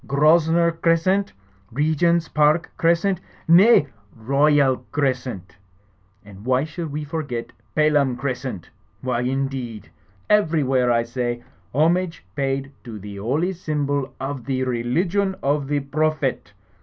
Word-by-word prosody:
Grosvenor 160 Hz, +3 st, +4 dB
Crescent! 165 Hz, +4 st, +1 dB, 0.4 s
Regent's 160 Hz, +5 st, +1 dB
Park 150 Hz, +3 st, +2 dB
Crescent! 170 Hz, +2 st, +2 dB, 0.3 s
Nay, 180 Hz, +1 st, +6 dB, 0.3 s
Royal 140 Hz, +3 st, +3 dB
Crescent! 125 Hz, -10 st, -2 dB, 0.7 s
And 100 Hz, -1 st, -13 dB
why 130 Hz, +2 st, +2 dB
should 160 Hz, 0 st, -6 dB
we 150 Hz, +1 st, -4 dB
forget 145 Hz, -6 st, -4 dB, 0.2 s
Pelham 150 Hz, -4 st, +3 dB
Crescent? 125 Hz, -7 st, -4 dB, 0.3 s
Why, 125 Hz, -2 st, -1 dB
indeed? 130 Hz, -4 st, -3 dB, 0.4 s
Ever3rwhere, 145 Hz, -11 st, +2 dB
I 115 Hz, -1 st, +2 dB
say, 120 Hz, 0 st, -3 dB, 0.3 s
homage 165 Hz, -, +1 dB
paid 135 Hz, 0 st, -2 dB
to 115 Hz, -4 st, -8 dB
the 100 Hz, 0 st, -9 dB
holy 145 Hz, -, -1 dB
symbol 145 Hz, -5 st, -2 dB
of 135 Hz, -2 st, -5 dB
the 130 Hz, -1 st, -1 dB
religion 170 Hz, +11 st, 0 dB
of 145 Hz, 0 st, 0 dB
the 145 Hz, 0 st, 0 dB
Prophet! 145 Hz, -5 st, -1 dB
140 Hz, 115 wpm, -22 LUFS, 125-165 Hz, 0.7 s, Nay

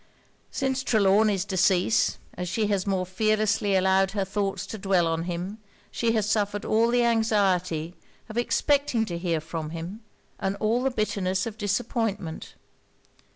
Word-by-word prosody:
Since 265 Hz, -1 st, -1 dB
Trelawny's 205 Hz, -3 st, +3 dB
decease, 190 Hz, +2 st, +2 dB, 0.2 s
as 180 Hz, 0 st, -4 dB
she 220 Hz, +4 st, 0 dB
has 200 Hz, -2 st, 0 dB
more 190 Hz, -2 st, 0 dB
fearlessly 210 Hz, +1 st, +1 dB
allowed 190 Hz, 0 st, +3 dB
her 200 Hz, -2 st, 0 dB
thoughts 195 Hz, -1 st, -2 dB
to 220 Hz, -, -7 dB
dwell 190 Hz, -3 st, +2 dB
on 165 Hz, 0 st, -1 dB
him, 180 Hz, +4 st, -4 dB, 0.3 s
she 230 Hz, -1 st, 0 dB
has 215 Hz, -2 st, +1 dB
suffered 205 Hz, -1 st, 0 dB
all 225 Hz, +2 st, +3 dB
the 245 Hz, 0 st, +3 dB
anxiety 190 Hz, -8 st, +1 dB, 0.3 s
of 220 Hz, -, -9 dB
expecting 245 Hz, 0 st, +1 dB
to 170 Hz, -4 st, -4 dB
hear 170 Hz, -2 st, 0 dB
from 160 Hz, 0 st, -5 dB
him, 170 Hz, +7 st, -7 dB, 0.4 s
and 195 Hz, +1 st, -1 dB
all 225 Hz, +3 st, +1 dB
the 270 Hz, -, +1 dB
bitterness 200 Hz, -5 st, -1 dB
of 225 Hz, -3 st, -5 dB
disappointment. 205 Hz, -4 st, -2 dB
200 Hz, 150 wpm, -26 LUFS, 185-220 Hz, 0.4 s, Trelawny's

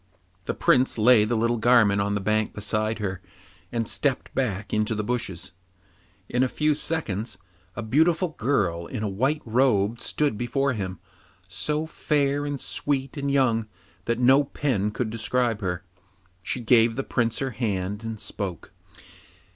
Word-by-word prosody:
The -, -, -2 dB
Prince 130 Hz, -1 st, +3 dB
lay 110 Hz, -1 st, +6 dB
the 120 Hz, +2 st, 0 dB
little 115 Hz, +1 st, +1 dB
garment 110 Hz, -4 st, +4 dB
on 100 Hz, 0 st, 0 dB
the 100 Hz, -, -1 dB
bank 105 Hz, +2 st, 0 dB
beside 110 Hz, +1 st, -1 dB
her, 95 Hz, -3 st, -3 dB, 0.5 s
and 115 Hz, -2 st, -1 dB
stepped 140 Hz, -3 st, -1 dB
back 105 Hz, -6 st, -2 dB
into 110 Hz, +1 st, +1 dB
the 105 Hz, -, -2 dB
bushes. 95 Hz, -6 st, -3 dB, 0.8 s
In 125 Hz, -, 0 dB
a 130 Hz, -, +4 dB
few 150 Hz, +2 st, +1 dB
seconds 115 Hz, -, -3 dB, 0.4 s
a 120 Hz, -, -4 dB
beautiful 160 Hz, -, +2 dB
girl 100 Hz, -, 0 dB
in 115 Hz, -5 st, -4 dB
a -, -, 0 dB
white 130 Hz, +10 st, 0 dB
robe 115 Hz, -2 st, +2 dB
stood 145 Hz, -9 st, -1 dB
before 135 Hz, +3 st, 0 dB
him, 95 Hz, -5 st, -4 dB, 0.5 s
so 150 Hz, -, -1 dB
fair 145 Hz, -2 st, 0 dB
and 145 Hz, -1 st, -3 dB
sweet 135 Hz, -1 st, -2 dB
and 140 Hz, -1 st, -2 dB
young 120 Hz, -5 st, +2 dB, 0.4 s
that 115 Hz, 0 st, 0 dB
no 130 Hz, +3 st, +5 dB
pen 125 Hz, -7 st, -1 dB
could 110 Hz, +1 st, -3 dB
describe 115 Hz, 0 st, 0 dB
her. 90 Hz, -2 st, -2 dB, 0.6 s
She 120 Hz, +6 st, -3 dB
gave 115 Hz, -1 st, +4 dB
the 135 Hz, -, -2 dB
Prince 115 Hz, -3 st, 0 dB
her 135 Hz, -1 st, -2 dB
hand 105 Hz, -3 st, -2 dB
and 110 Hz, -1 st, -5 dB
spoke. 100 Hz, -5 st, -5 dB
115 Hz, 155 wpm, -25 LUFS, 105-135 Hz, 0.8 s, lay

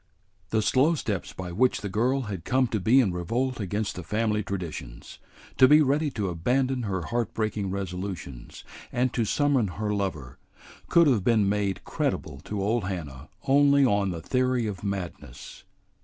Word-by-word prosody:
The 110 Hz, -1 st, +1 dB
slow 145 Hz, +9 st, +3 dB
steps 105 Hz, -, -3 dB
by 90 Hz, -1 st, -7 dB
which 125 Hz, +8 st, +2 dB
the 105 Hz, -, -3 dB
girl 125 Hz, +7 st, +1 dB
had 100 Hz, -8 st, -5 dB
come 130 Hz, +5 st, +2 dB
to 110 Hz, -, -1 dB
be 110 Hz, +8 st, +4 dB
in 110 Hz, -8 st, +3 dB
revolt 120 Hz, +9 st, -2 dB
against 100 Hz, +1 st, -2 dB
the 90 Hz, -, -5 dB
family 105 Hz, +3 st, 0 dB
traditions, 85 Hz, -, -7 dB, 0.4 s
to 130 Hz, -, +9 dB
be 150 Hz, +3 st, +7 dB
ready 145 Hz, +2 st, +1 dB
to 105 Hz, -7 st, -3 dB
abandon 125 Hz, +10 st, 0 dB
her 95 Hz, -5 st, -2 dB
heart 120 Hz, +5 st, -2 dB
breaking 105 Hz, -3 st, -1 dB
resolutions, 90 Hz, -9 st, -6 dB, 0.3 s
and 125 Hz, +1 st, 0 dB
to 115 Hz, -, 0 dB
summon 140 Hz, -1 st, +2 dB
her 105 Hz, 0 st, -1 dB
lover, 85 Hz, -11 st, -4 dB, 0.5 s
could 170 Hz, 0 st, +6 dB
have 120 Hz, -10 st, +3 dB
been 110 Hz, -2 st, +3 dB
made 100 Hz, -2 st, -1 dB
credible 70 Hz, -, -3 dB
to 105 Hz, -2 st, -3 dB
old 110 Hz, 0 st, 0 dB
Hannah 80 Hz, -7 st, -6 dB, 0.2 s
only 140 Hz, 0 st, +5 dB
on 100 Hz, -5 st, +2 dB
the 85 Hz, -3 st, -4 dB
theory 125 Hz, -2 st, +1 dB
of 100 Hz, -4 st, -5 dB
madness. 100 Hz, -4 st, -6 dB
105 Hz, 170 wpm, -26 LUFS, 95-125 Hz, 0.5 s, to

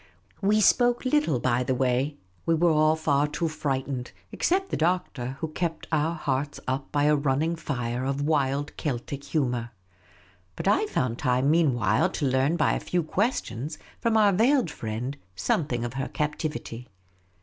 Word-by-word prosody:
We 210 Hz, +2 st, +3 dB
spoke 245 Hz, +4 st, +4 dB
little 255 Hz, -, +2 dB
by 120 Hz, 0 st, +1 dB
the 130 Hz, +1 st, 0 dB
way; 130 Hz, +3 st, 0 dB, 0.3 s
we 165 Hz, -, +4 dB
were 170 Hz, +1 st, +3 dB
all 155 Hz, 0 st, +4 dB
far 150 Hz, -2 st, +1 dB
too 165 Hz, +3 st, -2 dB
frightened, 135 Hz, -4 st, -3 dB, 0.2 s
except 385 Hz, +2 st, 0 dB
the -, -, +1 dB
Doctor, 145 Hz, -7 st, -1 dB
who 160 Hz, -, -2 dB
kept 165 Hz, +1 st, -3 dB
our 160 Hz, +1 st, +1 dB
hearts 145 Hz, -2 st, -2 dB
up 135 Hz, +2 st, -2 dB
by 145 Hz, -1 st, +1 dB
a 150 Hz, +1 st, +4 dB
running 145 Hz, +3 st, +1 dB
fire 125 Hz, -6 st, -3 dB
of 135 Hz, +1 st, -1 dB
wild 145 Hz, -1 st, 0 dB
Celtic 140 Hz, 0 st, -3 dB
humour. 125 Hz, -6 st, -1 dB, 0.9 s
But -, -, -4 dB
I 415 Hz, -, +3 dB
found 125 Hz, -, -1 dB
time 130 Hz, +1 st, +2 dB
meanwhile 120 Hz, -, +3 dB
to 145 Hz, -, -1 dB
learn 135 Hz, +5 st, +2 dB
by 155 Hz, -, +3 dB
a -, -, -1 dB
few 175 Hz, -1 st, -1 dB
questions 155 Hz, -, -2 dB, 0.2 s
from 230 Hz, -1 st, +2 dB
our 210 Hz, -2 st, +5 dB
veiled 235 Hz, -, +3 dB
friend 120 Hz, +5 st, -4 dB, 0.2 s
something 120 Hz, -, 0 dB
of 120 Hz, -, -5 dB
her 135 Hz, +1 st, -2 dB
captivity. 150 Hz, -5 st, -4 dB
145 Hz, 160 wpm, -26 LUFS, 130-165 Hz, 0.9 s, our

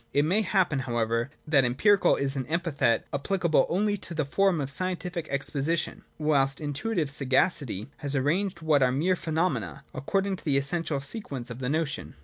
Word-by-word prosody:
It 145 Hz, +1 st, +3 dB
may 190 Hz, +7 st, +2 dB
happen, 185 Hz, -8 st, +1 dB
however, 120 Hz, -1 st, -1 dB, 0.2 s
that 145 Hz, -3 st, +4 dB
empirical 180 Hz, -, +3 dB
is 140 Hz, 0 st, -1 dB
an 130 Hz, -2 st, -3 dB
epithet 160 Hz, -8 st, +1 dB
applicable 170 Hz, +3 st, +1 dB
only 205 Hz, +3 st, +1 dB
to 170 Hz, -3 st, -6 dB
the 155 Hz, -2 st, 0 dB
form 190 Hz, +4 st, +2 dB
of 140 Hz, -1 st, -3 dB
scientific 180 Hz, 0 st, -1 dB
ex 140 Hz, -1 st, -2 dB
position; 155 Hz, +4 st, -1 dB, 0.2 s
whilst 140 Hz, -3 st, +1 dB
intuitive 150 Hz, +2 st, -2 dB
sagacity 130 Hz, -, +1 dB
has 145 Hz, -1 st, -1 dB
arranged 170 Hz, +6 st, 0 dB
what 155 Hz, -3 st, +3 dB
are 130 Hz, -1 st, +4 dB
mere 165 Hz, +8 st, +1 dB
phenomena, 160 Hz, -3 st, -2 dB
According 195 Hz, +8 st, -1 dB
to -, -, -13 dB
the 145 Hz, -4 st, +2 dB
essential 145 Hz, +1 st, 0 dB
se 140 Hz, +11 st, -4 dB
quence 130 Hz, -9 st, -6 dB
of 120 Hz, -, -7 dB
the 125 Hz, -1 st, -2 dB
notion. 145 Hz, -, -2 dB
150 Hz, 175 wpm, -27 LUFS, 135-180 Hz, 0.2 s, that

